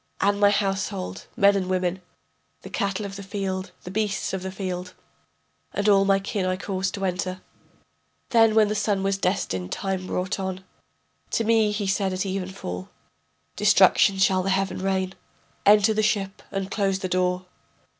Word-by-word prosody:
And 200 +1 +2
my 205 0 +6
household, 195 - -2
men 200 0 +5
and 190 -2 -1
women, 185 0 0 0.6
The - - -10
cattle 200 +1 -1
of 195 0 -6
the - - -7
field, 190 -1 -3
the 180 - -7
beasts 205 -1 -1
of 190 - -2
the 190 0 -5
field, 185 -1 -5 0.8
And 205 +1 0
all 195 -1 +5
my 195 0 +4
kin 195 0 -3
I 185 0 0
caused 190 0 -2
to 195 -1 -3
enter. 185 0 -2 0.9
Then 225 -2 +5
when 215 -1 +5
the 210 - -1
sun 205 -2 0
the 195 - +1
destined 180 - -1
time 190 -2 -3
brought 185 +2 -2
on, 190 0 -4 0.7
To 230 - +2
me 220 -1 +3
he 210 0 -2
said 195 0 0
at 185 +1 -2
even 190 -1 -3
fall: 90 - -6 0.7
Destruction 195 - +5
shall 190 -1 +3
the 190 - -2
heaven 195 0 0
rain. 190 0 -1 0.5
Enter 210 +1 +6
the 215 - +1
ship 200 -2 -1
and 195 -1 -4
close 195 -2 +1
the 190 - -3
door. 180 0 0
195 Hz, 175 wpm, -25 LUFS, 185-200 Hz, 0.9 s, my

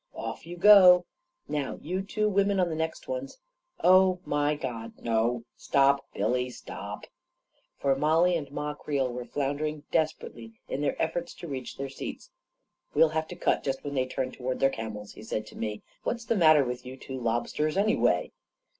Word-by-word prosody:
"Off - - -6
you 175 +1 -7
go! 180 -2 +8 0.4
Now 145 -3 -2
you 185 +5 -3
two 215 +2 -1
women 200 -1 +2
on 180 -1 +2
the 160 - -3
next 160 0 -3
ones - - -4 0.2
— 350 0 -23
oh, 185 -1 +5
my 145 +1 +1
God, 120 -5 -5
no! 115 +1 0
Stop, 140 +2 +2
Billy, 125 +5 0
stop! 125 - -8 0.4
" - - -44
for 135 -1 +2
Mollie 160 +5 +3
and 150 -4 -3
Ma 150 +1 -3
Creel 140 -4 -2
were 125 0 -5
floun 140 +1 -2
dering 155 0 -3
desperately 120 -8 -2
in 135 - -3
their 145 - -1
efforts 170 +1 -2
to 170 - -8
reach 130 -4 -6
their 140 - -3
seats. 135 - -8 0.3
" - - -48
We'll 165 - +6
have 160 0 -2
to - - -8
cut - - +1
just 135 -1 -2
when 145 - -4
they 130 -2 0
turn 130 0 -3
to - - -14
ward 130 +1 -2
their 135 - +4
camels," 105 -3 -6
he - - -12
said 110 0 -3
to - - -13
me. 105 -1 -4 0.2
"What's 235 -1 -3
the 230 - +1
matter 155 -6 +6
with 125 0 -4
you 130 +1 -9
two 130 0 -7
lobsters, 120 +7 -1
anyway 215 +2 +2
145 Hz, 195 wpm, -28 LUFS, 125-170 Hz, 0.4 s, go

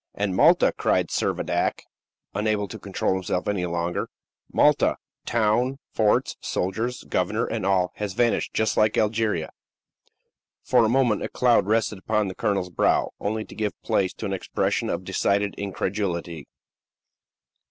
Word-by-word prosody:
"And 100 -2 -1
Malta," - - +5
cried - - +1
Servadac, - - -1 0.5
unable 105 0 0
to 110 - -8
control 100 -1 -1
himself 90 -1 -2
any 95 -4 0
longer; 85 0 -2 0.4
"Malta - - +3 0.3
town, 120 +4 +1 0.2
forts, 105 -2 +2
soldiers, 110 +7 -2
governor, 105 +5 0
and 110 -4 -2
all 95 -2 +2
has 105 -3 -3
vanished 120 +3 +1
just 110 -1 0
like 110 0 +2
Algeria." 105 -6 0 1.1
For - - +4
a 110 - +3
moment 120 -4 +2
a - - -3
cloud 120 -5 +3
rested 110 -2 +1
upon 105 0 0
the 95 - -7
colonel's 100 -5 -1
brow, - - +2
only 110 +1 -2
to - - -13
give 105 -2 -3
place 95 -2 +1
to - - -7
an 100 - -2
expression 95 - -1
of - - -2
decided 100 0 0
incredulity. 95 -6 -3
105 Hz, 140 wpm, -25 LUFS, 95-110 Hz, 1.1 s, Malta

